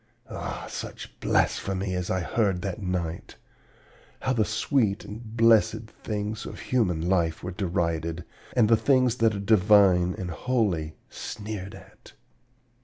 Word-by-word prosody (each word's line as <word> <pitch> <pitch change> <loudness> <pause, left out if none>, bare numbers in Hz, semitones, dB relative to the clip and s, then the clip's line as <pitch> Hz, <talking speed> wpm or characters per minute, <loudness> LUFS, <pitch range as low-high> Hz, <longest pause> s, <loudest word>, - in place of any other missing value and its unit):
Ah, - - -5
such - - -8
blasphemy 95 0 0
as 90 -1 -2
I 95 - 0
heard 95 -2 0
that 100 +1 -4
night! 90 -3 -3 0.9
How 130 - +1
the 110 -3 +2
sweet 110 0 0
and 110 +1 -9
blessed 115 0 +4 0.2
things 105 0 -3
of - - -8
human 90 -10 0
life 85 -3 +1
were 90 - -4
derided, 85 -2 -2 0.3
and 115 -4 +5
the 115 +1 +5
things 125 -1 +3
that 115 -2 +3
are - - -3
divine 100 -3 +4
and 90 -4 -4
holy 90 -8 -1 0.2
sneered 105 -2 -6
at! - - -16
100 Hz, 135 wpm, -26 LUFS, 90-110 Hz, 0.9 s, and